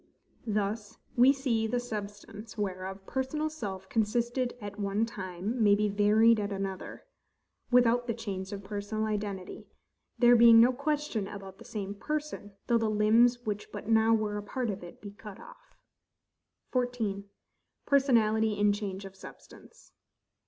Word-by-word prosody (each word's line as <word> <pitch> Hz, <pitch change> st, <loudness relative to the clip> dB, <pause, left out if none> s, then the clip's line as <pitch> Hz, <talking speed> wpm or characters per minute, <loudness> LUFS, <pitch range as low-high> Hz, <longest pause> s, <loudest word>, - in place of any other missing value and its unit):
Thus, 210 Hz, +1 st, -2 dB, 0.2 s
we 250 Hz, +3 st, +7 dB
see 250 Hz, -5 st, 0 dB
the 245 Hz, +2 st, 0 dB
SUBSTANCE 210 Hz, -1 st, -7 dB
whereof 190 Hz, -1 st, -4 dB
personal 300 Hz, +6 st, -2 dB
self 195 Hz, -10 st, -6 dB
consisted 240 Hz, +4 st, 0 dB
at 205 Hz, -1 st, -8 dB
one 200 Hz, +2 st, 0 dB
time 195 Hz, +2 st, -4 dB
may 205 Hz, -1 st, +6 dB
be 210 Hz, 0 st, +1 dB
varied 215 Hz, +3 st, +4 dB
at 205 Hz, 0 st, -3 dB
another, 195 Hz, -1 st, -5 dB, 0.6 s
without 245 Hz, -1 st, +4 dB
the 230 Hz, -, -1 dB
change 195 Hz, -4 st, -5 dB
of 200 Hz, -1 st, -6 dB
personal 205 Hz, +2 st, -3 dB
identity; 205 Hz, -3 st, -4 dB, 0.5 s
there 240 Hz, 0 st, +6 dB
being 230 Hz, -1 st, +8 dB
no 245 Hz, +3 st, +6 dB
question 280 Hz, -6 st, -2 dB
about 195 Hz, -1 st, -9 dB
the -, -, -13 dB
same 200 Hz, -2 st, -5 dB
person, 300 Hz, -3 st, -5 dB
though 235 Hz, -1 st, +2 dB
the 225 Hz, -1 st, 0 dB
limbs 230 Hz, +3 st, +3 dB
which 210 Hz, -1 st, -4 dB
but -, -, -7 dB
now 225 Hz, 0 st, +4 dB
were 215 Hz, -2 st, +1 dB
a -, -, -3 dB
part 245 Hz, +1 st, -2 dB
of 195 Hz, -, -7 dB
it, 175 Hz, -, -12 dB
be 205 Hz, -, -8 dB
cut 205 Hz, -1 st, -11 dB
off. -, -, -16 dB, 0.9 s
14. 240 Hz, -6 st, -1 dB, 0.6 s
Personality 220 Hz, -6 st, +3 dB
in 205 Hz, 0 st, +2 dB
Change 200 Hz, -2 st, -5 dB
of 195 Hz, 0 st, -10 dB
Substance. 460 Hz, -, -15 dB
215 Hz, 150 wpm, -29 LUFS, 200-240 Hz, 0.9 s, being